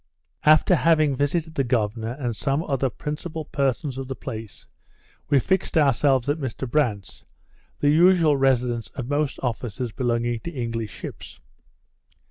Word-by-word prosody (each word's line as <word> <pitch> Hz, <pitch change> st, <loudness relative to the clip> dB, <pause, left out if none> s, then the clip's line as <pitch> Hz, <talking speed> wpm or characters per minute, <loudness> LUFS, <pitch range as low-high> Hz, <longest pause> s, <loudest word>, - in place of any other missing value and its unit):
After 155 Hz, +4 st, +6 dB
having 155 Hz, -4 st, +3 dB
visited 155 Hz, +4 st, -1 dB
the 140 Hz, -, 0 dB
governor 115 Hz, -2 st, -1 dB
and 125 Hz, -4 st, -3 dB
some 140 Hz, +6 st, -1 dB
other 135 Hz, -4 st, 0 dB
principal 155 Hz, +6 st, -5 dB
persons 135 Hz, 0 st, -1 dB
of 135 Hz, -, -5 dB
the 135 Hz, -, -4 dB
place, 110 Hz, -4 st, -8 dB, 0.6 s
we 145 Hz, -, +4 dB
fixed 190 Hz, +5 st, 0 dB
ourselves 135 Hz, -3 st, +3 dB
at 145 Hz, +3 st, 0 dB
Mr 130 Hz, -1 st, -4 dB
Brandt's, 115 Hz, -7 st, -1 dB, 0.6 s
the 145 Hz, -, +4 dB
usual 165 Hz, -1 st, +5 dB
residence 125 Hz, -4 st, +1 dB
of 125 Hz, -3 st, -5 dB
most 145 Hz, 0 st, -1 dB
officers 120 Hz, -1 st, -3 dB
belonging 120 Hz, -1 st, -1 dB
to 170 Hz, -, -6 dB
English 115 Hz, -6 st, -3 dB
ships. -, -, -9 dB
135 Hz, 140 wpm, -24 LUFS, 120-150 Hz, 0.6 s, After